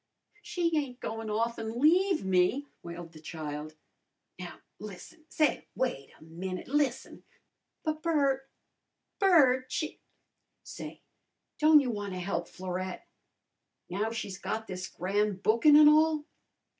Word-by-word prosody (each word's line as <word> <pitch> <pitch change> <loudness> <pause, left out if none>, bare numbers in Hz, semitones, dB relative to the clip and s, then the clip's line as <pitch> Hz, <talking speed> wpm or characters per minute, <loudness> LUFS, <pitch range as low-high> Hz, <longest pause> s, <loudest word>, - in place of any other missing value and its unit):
"She 340 -5 -1
ain't 270 -5 -2
goin' 225 0 -5
off 230 +2 -1
an' 225 +1 -4
leave 355 - +4
me!" 190 +9 +2 0.2
wailed 170 -1 -8
the 160 - -13
child. 155 -1 -6 0.6
"Now, 180 -1 -8 0.2
lissen! 215 - -11
Say, 305 -2 +1
wait 140 - -2
a - - -16
minute! 180 +3 -6
Lissen!" 280 -2 -1 0.6
"But, 310 -1 -2
Bert! 275 -5 +1 0.7
Bert! 270 -10 +4
She 310 - -3 0.3
" - - -52
"Say, - - -9 0.6
don't 305 -1 +7
you 255 -3 -1
wanna 200 -4 -4
help 175 -2 -2
Florette, 185 - -5 0.8
now 205 +4 0
she's 200 -4 -5
got 220 0 -3
this 185 -3 -5
gran' 205 +3 0
bookin' 230 +9 +5
an' 300 0 +9
all?" 310 0 +4
225 Hz, 130 wpm, -30 LUFS, 185-300 Hz, 0.8 s, an